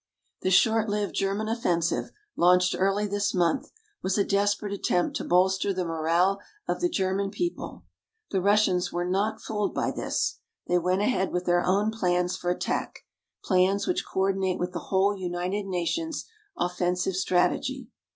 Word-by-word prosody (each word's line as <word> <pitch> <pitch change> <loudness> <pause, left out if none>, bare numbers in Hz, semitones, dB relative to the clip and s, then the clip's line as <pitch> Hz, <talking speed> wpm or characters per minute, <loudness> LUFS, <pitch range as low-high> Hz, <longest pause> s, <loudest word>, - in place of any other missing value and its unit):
The - - 0
short 220 +3 +4
lived 205 0 -1
German 200 +2 -1
offensive, 175 -8 0 0.3
launched 180 +1 +4
early 195 +2 +1
this 205 0 -1
month, 180 +9 +1 0.3
was 190 +2 0
a 200 - +4
desperate 205 0 0
attempt 180 -3 0
to - - -4
bolster 190 +2 +2
the 180 -1 -1
morale 170 +4 +1 0.3
of - - -2
the 350 - +2
German 195 - 0
people. 350 - -4 0.5
The 190 - +1
Russians 200 -2 +2
were 175 0 -2
not 195 +4 -1
fooled 210 -2 -2
by - - 0
this. - - -2 0.3
They 180 - +2
went 185 +3 +1
ahead 195 -4 +1
with 180 0 -2
their 175 0 +3
own 200 +4 +2
plans 180 -4 0
for 175 - -3
attack 180 - -2 0.4
plans 190 +1 +2
which 360 - 0
coordinate 190 -1 0
with 180 0 -2
the 175 - -3
whole 195 +1 +3
United 185 +2 -3
Nations' 295 - -2 0.3
offensive 180 +1 0
strategy. 210 +7 0
190 Hz, 155 wpm, -27 LUFS, 180-205 Hz, 0.5 s, short